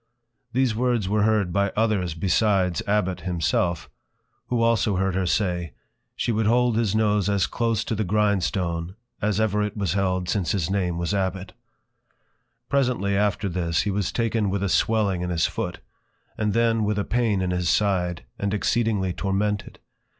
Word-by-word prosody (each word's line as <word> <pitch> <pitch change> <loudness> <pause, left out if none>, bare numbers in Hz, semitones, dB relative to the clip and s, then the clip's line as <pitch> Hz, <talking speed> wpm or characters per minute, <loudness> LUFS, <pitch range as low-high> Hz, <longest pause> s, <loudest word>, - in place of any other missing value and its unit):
_ - - -49 0.5
These 125 -2 +1
Words 120 -4 0
were 105 +2 +1
heard 105 -4 +2
by 100 0 +1
others 100 -7 +1
besides 95 0 +1
Abbot 100 -3 0
himself; 85 -1 -1 0.6
who 120 -2 +1
also 115 -3 +2
heard 95 0 0
her 95 0 0
say, 90 -4 -1 0.4
She - - -1
would 110 -1 +1
hold 120 0 +3
his 110 -3 +1
Nose 105 -2 +2
as 100 -3 +2
close 115 -3 -1
to - - -3
the 110 0 0
Grindstone 95 -4 0 0.3
as 105 -1 0
ever 105 -1 +1
it 105 0 -3
was 95 -5 0
held 95 -2 0
since 90 0 0
his 95 -3 -1
Name 90 -4 0
was 85 +3 -1
+Abbot+. 95 -1 -2 1.1
Presently 125 -8 +1
after 100 0 +1
this, 85 -1 0
he 105 - -1
was 100 -1 -1
taken 115 -3 0
with 100 +1 -1
a 100 - 0
Swelling 100 -3 +1
in 90 - -2
his 85 -2 +1
Foot, - - -4 0.5
and 105 -2 -1
then 115 -1 +2
with 105 0 0
a 100 - +1
Pain 115 -4 +1
in 90 - -1
his 90 -2 0
Side, 90 -6 +1 0.2
and 100 +1 -1
exceedingly 105 -4 0
tormented. 100 +2 -2
100 Hz, 170 wpm, -24 LUFS, 90-110 Hz, 1.1 s, hold